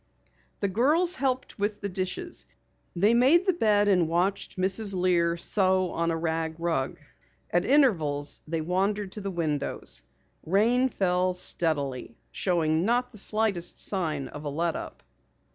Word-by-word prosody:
The 200 - +1
girls 300 - +2
helped 260 - -2
with 205 +1 -2
the 200 - -2
dishes. 195 - -4 0.5
They 205 +6 +3
made 275 +10 +5
the 375 - +3
bed 210 -9 +2
and 180 -5 +3
watched 185 +5 -1
Mrs. 195 +2 +3
Lear 175 -2 +2
sew 185 0 +1
on 170 0 -1
a 165 - 0
rag 160 0 -2
rug. 165 -6 -1 0.5
At 175 - +1
intervals 160 - +2
they 165 +1 -2
wandered 195 +4 -1
to 210 - -6
the 200 - -3
windows. 155 - -2 0.4
Rain 235 +9 +2
fell 180 -3 0
steadily, 140 -9 -1
showing 165 -3 0
not 245 +4 +1
the 215 - -10
slightest 210 -4 -1
sign 155 -8 -2
of 150 - -9
a 145 - -3
let 165 +3 -1
up. - - -8
185 Hz, 145 wpm, -27 LUFS, 165-215 Hz, 0.5 s, made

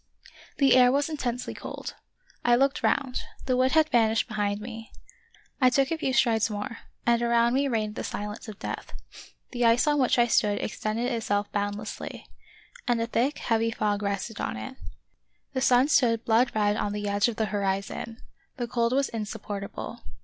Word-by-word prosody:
The 275 -3 +5
air 250 -1 +6
was 280 +3 +1
intensely 250 -5 -3
cold; - - -7 0.5
I 240 0 +5
looked 275 +2 +2
round 260 -3 +1
— - - -17
the 255 - +1
wood 255 +1 +2
had 315 -1 +5
vanished 225 -3 +3
behind 205 -2 -1
me. 225 0 -8 0.7
I 255 - +7
took 270 +3 +2
a 330 - 0
few 270 - 0
strides 230 -4 +3
more 215 +3 -5
— - - -42
and 235 0 +3
around 235 0 +3
me 275 +2 +2
reigned 215 -4 -1
the - - -5
silence 210 +3 -5
of 215 -2 -8
death: - - -6 0.6
the 245 -1 -1
ice 230 +3 +4
on 295 -1 +2
which 255 -2 +3
I 240 - +5
stood 210 -3 +2
extended 225 +4 -2
itself 205 -3 -1
boundlessly, 205 +1 -4 0.6
and 240 -1 +2
a 230 - 0
thick, 245 +5 0
heavy 230 -1 +1
fog 210 -2 -1
rested 200 +2 -3
on - - -3
it. 110 - -7 0.8
The 260 - -1
sun 255 +1 +5
stood 235 -6 +3
blood 235 +2 +3
red 210 -1 +2
on 205 - -1
the 205 0 -3
edge 200 +1 +2
of 235 - -2
the 220 - 0
horizon. 200 +3 -2 0.3
The 240 -2 -2
cold 235 0 0
was 275 +1 +2
insupportable. 210 -2 -5
230 Hz, 185 wpm, -27 LUFS, 210-250 Hz, 0.8 s, I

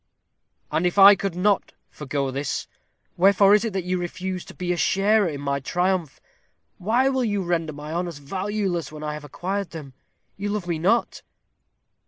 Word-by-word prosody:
"And 180 +3 +1
if 175 - -3
I 200 +1 +10
could 195 -3 -3
not 200 +2 +1 0.2
forego 140 -2 -3
this, 140 +1 -3 0.5
wherefore 195 +2 +5
is 210 +1 +4
it 220 - -3
that 190 -2 -2
you 180 +1 -1
refuse 180 +1 -4
to - - -12
be 180 -1 -1
a - - -2
sharer 200 +4 +2
in 145 -3 -5
my 140 0 -1
triumph? 180 +1 -1 0.6
Why 235 +8 +2
will 265 -1 +1
you 205 -4 0
render 170 -2 -1
my 150 +1 -8
honors 175 -2 -3
valueless 185 +3 -3
when 155 0 -9
I 150 0 -3
have 150 0 -7
acquired 190 +6 -4
them? 150 -5 -9 0.4
You 200 +1 -3
love 205 -3 -2
me 170 -2 -2
not." 205 +8 +1
180 Hz, 180 wpm, -24 LUFS, 155-200 Hz, 0.6 s, I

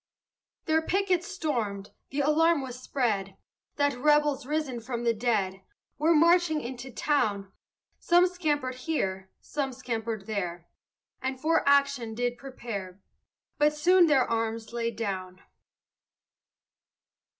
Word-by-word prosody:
Their 320 0 +2
pickets 370 0 0
stormed, 210 -9 -3 0.2
the 285 +2 -1
alarm 310 +1 +3
was 255 -1 -7
spread, 205 -8 -1 0.4
That 285 0 +2
rebels 295 0 +2
risen 300 -5 -2
from 235 0 -5
the 235 -1 +3
dead 210 -5 -1 0.4
Were 320 +2 +4
marching 335 0 +4
into 255 0 -7
town. 210 -9 0 0.5
Some 350 +1 +4
scampered 300 -8 -1
here, 195 -9 -3
some 275 -2 -3
scampered 230 -4 -4
there, 175 -5 -4 0.5
And 265 0 -2
some 260 - -23
for 320 -2 +3
action 280 -5 +2
did 245 +1 -2
prepare; 205 -8 -7 0.6
But 300 0 +3
soon 355 +3 +5
their 275 -4 +3
arms 225 0 -2
laid 230 -1 -2
down. 185 -4 -4
255 Hz, 120 wpm, -28 LUFS, 220-300 Hz, 0.6 s, soon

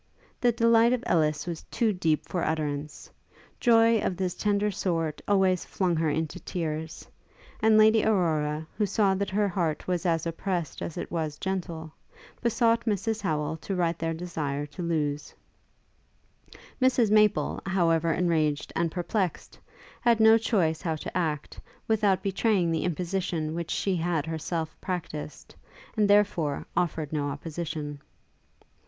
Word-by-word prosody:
The 245 - +3
delight 230 0 +4
of 250 -1 -1
Ellis 155 -3 +1
was 170 -2 -5
too 225 -3 +1
deep 160 -4 0
for 180 - -2
utterance. 150 -2 -3 0.5
Joy 230 -1 +5
of 180 - -2
this 185 -2 -1
tender 205 0 0
sort 165 -5 -2
always 190 -3 +3
flung 180 -3 -1
her 160 -1 +1
into 155 +1 -2
tears; 160 -2 -4 0.5
and 220 0 +5
Lady 220 0 +6
Aurora, 160 -7 +1
who 210 - +2
saw 200 -1 +2
that 195 0 -1
her 205 +2 +1
heart 170 -5 -2
was 180 -2 0
as 165 -1 +1
oppressed 170 0 -3
as 170 - -5
it - - -5
was 155 -3 -2
gentle, 170 -4 -4 0.5
besought 230 0 +2
Mrs 220 0 -1
Howel 155 -4 -1
to 195 +5 -4
write 170 -2 0
their 165 0 -1
desire 155 -4 -3
to 150 +5 -9
Lewes. 150 -4 -2 1.5
Mrs 245 -4 +3
Maple, 210 -1 +3
however 165 -3 +2
enraged 160 -4 0
and 170 - +1
perplexed, 180 +1 -2 0.4
had 235 -2 +3
no 220 0 +7
choice 175 -9 +1
how 165 -4 -1
to 155 - -7
act, 155 -5 -2 0.3
without 205 -4 +2
betraying 195 -3 +1
the 165 - 0
imposition 175 -2 -2
which 170 0 -4
she 195 -2 0
had 165 -3 0
herself 160 0 -3
practised, 155 -5 -5 0.4
and 210 -2 +2
therefore 185 -8 +2
offered 160 -3 -1
no 145 -2 -1
opposition. 150 -1 -5
175 Hz, 145 wpm, -27 LUFS, 160-205 Hz, 1.5 s, no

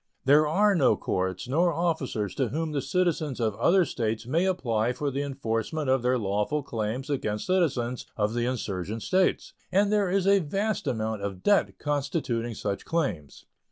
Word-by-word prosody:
There 150 +3 +5
are 205 +6 +3
no 135 - +3
courts 95 +1 -2
nor 170 +7 +2
officers 145 - -1
to 130 - 0
whom 155 +6 -2
the 145 -2 -1
citizens 155 -2 0
of 110 -3 0
other 180 0 +4
States 110 -4 -2
may 160 +9 +1
apply 120 - 0
for 145 +2 -2
the 135 +2 -2
enforcement 135 +1 -2
of 130 -1 +3
their 125 +1 +2
lawful 105 +7 -1
claims 115 +2 -3
against 110 -8 -2
citizens 135 -10 0
of 105 0 0
the 120 0 0
insurgent 105 -3 -3
States, 185 0 +1 0.2
and 200 +2 +3
there 205 -3 +2
is 190 0 +1
a 200 0 +5
vast 195 +3 -2
amount 110 -4 -2
of 100 -2 -5
debt 205 -1 +2
constituting 140 -5 -2
such 100 -2 -3
claims. 135 - -3
135 Hz, 170 wpm, -27 LUFS, 110-165 Hz, 0.2 s, There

